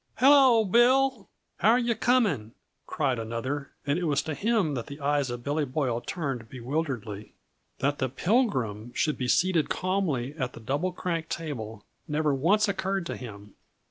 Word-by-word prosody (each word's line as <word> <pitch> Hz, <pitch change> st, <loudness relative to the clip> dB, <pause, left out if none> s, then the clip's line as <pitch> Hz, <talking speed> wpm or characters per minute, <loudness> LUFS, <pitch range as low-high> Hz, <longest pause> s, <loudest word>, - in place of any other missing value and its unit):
"Hello, 260 Hz, -3 st, +6 dB
Bill! 245 Hz, +2 st, +3 dB, 0.3 s
How're 225 Hz, +3 st, +4 dB
yuh 240 Hz, -1 st, +1 dB
coming?" 205 Hz, -, +1 dB, 0.3 s
cried 135 Hz, -6 st, 0 dB
another, 130 Hz, +6 st, -4 dB, 0.2 s
and 145 Hz, +4 st, +1 dB
it 180 Hz, -, -2 dB
was 145 Hz, -3 st, +1 dB
to 155 Hz, -, -3 dB
him 205 Hz, -3 st, +1 dB
that 120 Hz, -4 st, -4 dB
the 140 Hz, +1 st, -9 dB
eyes 145 Hz, -1 st, 0 dB
of 120 Hz, 0 st, -5 dB
Billy 145 Hz, +3 st, 0 dB
Boyle 130 Hz, -4 st, -1 dB
turned 135 Hz, -10 st, -4 dB
bewilderedly. 125 Hz, -5 st, -4 dB, 0.4 s
That 145 Hz, +1 st, 0 dB
the 130 Hz, -, 0 dB
Pilgrim 125 Hz, -, 0 dB
should 150 Hz, -, 0 dB
be 125 Hz, -, -1 dB
seated 175 Hz, +3 st, +2 dB
calmly 175 Hz, -9 st, -1 dB
at 125 Hz, -2 st, -2 dB
the -, -, -10 dB
Double 140 Hz, +11 st, -1 dB
Crank 170 Hz, -2 st, -3 dB
table 115 Hz, -10 st, -5 dB, 0.2 s
never 150 Hz, -1 st, +1 dB
once 195 Hz, +11 st, +3 dB
occurred 195 Hz, -1 st, -1 dB
to -, -, -4 dB
him. 105 Hz, -4 st, -10 dB
145 Hz, 160 wpm, -27 LUFS, 125-190 Hz, 0.4 s, Hello